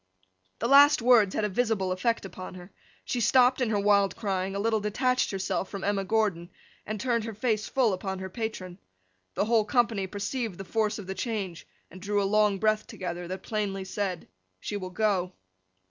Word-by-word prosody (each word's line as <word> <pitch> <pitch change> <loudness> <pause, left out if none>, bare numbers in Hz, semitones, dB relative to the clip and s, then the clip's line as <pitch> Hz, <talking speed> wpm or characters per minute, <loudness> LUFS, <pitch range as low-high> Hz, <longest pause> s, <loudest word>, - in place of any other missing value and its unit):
The 235 - -1
last 285 +3 +7
words 230 -6 +5
had 215 - +1
a - - -1
visible 205 -3 0
effect 230 +4 0
upon 185 -1 -8
her. 180 +1 -11 0.3
She 245 - -2
stopped 250 +3 +4
in 245 - +1
her 210 -2 +1
wild 200 -1 +3
crying, 195 -2 -2
a - - -2
little 220 +1 +1
detached 250 +5 0
herself 190 -1 -2
from 200 -2 -6
Emma 200 -1 0
Gordon, 195 -5 0 0.4
and 215 0 -3
turned 235 -1 0
her 225 -2 -6
face 215 -1 -1
full 245 -6 +2
upon 190 +1 -4
her 190 0 -5
patron. 190 -3 -5 0.6
The - - +1
whole 225 0 +3
company 220 -3 +1
perceived 205 +1 -4
the 195 - -7
force 215 +2 0
of 205 - -8
the 190 - -4
change, 195 -6 -4 0.2
and 185 - -12
drew 205 +1 0
a - - +1
long 210 0 +3
breath 215 +1 +1
together, 175 -1 -5
that 185 +1 -6
plainly 200 -3 -2
said, 190 -3 -3 0.3
'she 205 - -5
will 185 -2 -6
go! 185 -2 0
205 Hz, 190 wpm, -28 LUFS, 190-225 Hz, 0.6 s, last